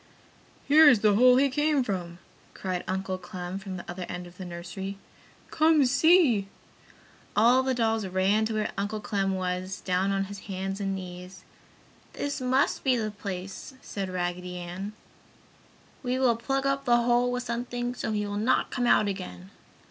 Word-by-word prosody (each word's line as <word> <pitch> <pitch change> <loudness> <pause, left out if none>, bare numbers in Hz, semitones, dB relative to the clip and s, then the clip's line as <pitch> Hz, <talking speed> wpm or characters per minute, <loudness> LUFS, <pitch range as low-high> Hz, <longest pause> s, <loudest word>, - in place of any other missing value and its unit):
"Here 305 +1 +8
is 240 -7 +4
the 210 -1 +4
hole 250 +4 +6
he 275 +2 +4
came 295 0 +1
from!" 180 -6 -4 0.4
cried 185 -2 -3
Uncle 190 0 -2
Clem 180 +1 -6
from 190 -1 -6
the 175 - -8
other 180 +1 -6
end 180 0 -5
of 175 +1 -14
the 185 - -7
nursery. 180 +3 -6 0.5
"Come, 315 -2 +4
see!" 275 - +4 0.9
All 240 +5 +5
the 260 0 0
dolls 225 -3 0
ran 190 +4 +2
to 220 0 -2
where 215 -1 -1
Uncle 205 +2 -2
Clem 195 -2 -1
was, 185 0 -3
down 185 +1 0
on 195 0 +1
his 200 0 -8
hands 195 +1 -3
and 195 -1 -1
knees. 180 0 -9 0.7
"This 285 -1 -3
must 260 +2 +1
be 260 -2 +3
the 215 -3 -2
place!" 195 +3 -7
said 195 -2 -4
Raggedy 180 0 -3
Ann. 180 +4 -6 1.1
"We 255 -1 -1
will 255 -3 +3
plug 270 +4 -2
up 275 0 0
the 240 -1 +4
hole 245 +1 +2
with 250 0 -2
something, 245 0 -3
so 235 - -3
he 210 -1 -1
will 205 0 -4
not 230 +5 +1
come 245 -2 0
out 215 - +4
again!" 100 - -6
205 Hz, 170 wpm, -27 LUFS, 185-245 Hz, 1.1 s, Here